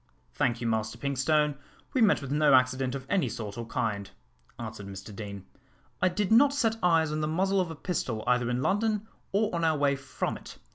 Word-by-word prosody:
"Thank 120 - 0
you, - - -3
Master 110 0 -1
Pinkstone, 140 +2 +1 0.3
we 260 - +2
met 205 -9 +4
with 135 - -6
no 150 -2 +5
accident 130 0 +2
of 135 -1 -6
any 195 +3 +1
sort 105 -3 -6
or 115 -1 -6
kind," 105 -4 -2 0.5
answered 100 - -7
Mr 100 +1 -9
Deane. 100 -2 -7 0.6
"I 185 - +4
did 190 +3 -1
not 275 +5 +6
set 225 -5 +1
eyes 165 -3 +3
on 155 0 -1
the 150 - 0
muzzle 190 +4 +2
of 180 - -2
a 160 - -6
pistol 130 -10 -3
either 125 -1 +2
in 125 +1 -1
London 215 +1 +1 0.2
or 210 +1 +1
on 170 -1 -1
our 160 -2 +3
way 140 -1 +2
from 135 - -4
it. - - -12
140 Hz, 205 wpm, -28 LUFS, 120-185 Hz, 0.6 s, not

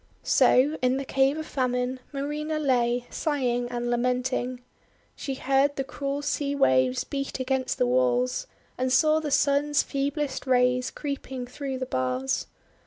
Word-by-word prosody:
So 285 +5 +4
in 255 +1 +2
the 275 - -4
Cave 270 +2 +2
of 315 - -4
Famine, 255 -1 -1
Marina 295 +2 -3
lay, 245 -4 +1
sighing 245 -6 -1
and 240 0 -2
lamenting. 250 +1 -1 0.5
She 270 - -4
heard 275 +2 +2
the 270 - -1
cruel 280 +1 -4
sea 285 -1 -1
waves 130 - +3
beat 275 -1 -4
against 260 0 -1
the - - +2
walls, 125 0 +1 0.3
and 255 0 0
saw 310 +4 +4
the 310 -1 -3
Sun's 285 +1 +2
feeblest 280 -1 -2
rays 250 0 +3
creeping 265 -3 -5
through 265 +1 -5
the 260 - -3
bars. 130 - -1
260 Hz, 145 wpm, -26 LUFS, 245-280 Hz, 0.5 s, So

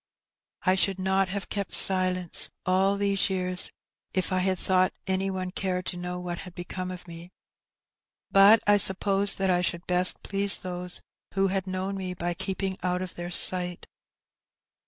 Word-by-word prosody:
"I 185 - +2
should 190 0 0
not 190 0 -1
have 195 0 -5
kept 200 -2 -1
silence 185 -2 +4 0.2
all 190 +2 +1
these 200 -1 -1
years 185 -1 +3 0.5
if 185 0 -2
I 185 - 0
had 185 0 -1
thought 185 0 0
any 190 0 -2
one 185 -1 -5
cared 185 -1 -4
to - - -1
know 180 0 -6
what 175 -1 -6
had 180 -2 -10
become 185 +1 -7
of 180 -1 -10
me, 170 +1 -12 1.0
but 200 +3 +6
I 205 0 +4
supposed 195 0 +3
that 195 -1 0
I 180 0 +1
should 175 -1 -3
best 180 0 +3
please 200 0 +3
those 180 -1 -4 0.3
who 195 0 +1
had 190 0 -3
known 185 +1 -4
me 185 -1 -6
by 175 0 -4
keeping 190 +1 -5
out 180 +1 -2
of 185 - -9
their 175 0 -8
sight." 180 0 +3
185 Hz, 170 wpm, -25 LUFS, 180-195 Hz, 1.0 s, but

